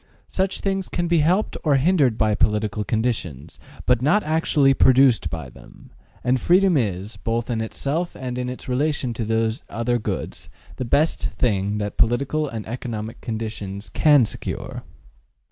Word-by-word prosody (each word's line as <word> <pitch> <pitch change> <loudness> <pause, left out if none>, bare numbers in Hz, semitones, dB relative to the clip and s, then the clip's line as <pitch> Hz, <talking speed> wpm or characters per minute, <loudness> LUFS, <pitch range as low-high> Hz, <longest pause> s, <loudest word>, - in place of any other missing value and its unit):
Such 190 0 -1
things 195 -1 -2
can 175 0 -1
be 170 -1 +3
helped 180 +8 +1
or 150 -3 +3
hindered 135 -5 +3
by 110 -1 +2
political 105 0 0
conditions, 95 - -3 0.3
but 125 -2 +3
not 155 +11 +3
actually 150 -3 +3
produced 130 -8 +4
by 80 -3 -5
them; - - -16 0.3
and 125 +1 +2
freedom 185 0 +4
is, 105 -4 -1
both 115 +1 -2
in 115 -1 -1
itself 145 +9 -3
and 125 -2 -5
in 125 0 -2
its 125 - -8
relation 135 -1 0
to 115 - -3
these 110 +3 0
other 120 +1 -1
goods - - -5 0.3
the 130 - -3
best 150 +7 +1
thing 100 -3 0
that 105 -1 -4
political 140 +6 +1
and 110 -3 -6
economic 115 -2 -5
conditions 110 -3 -5
can 145 -5 +5
secure. - - -5
125 Hz, 155 wpm, -22 LUFS, 110-150 Hz, 0.3 s, can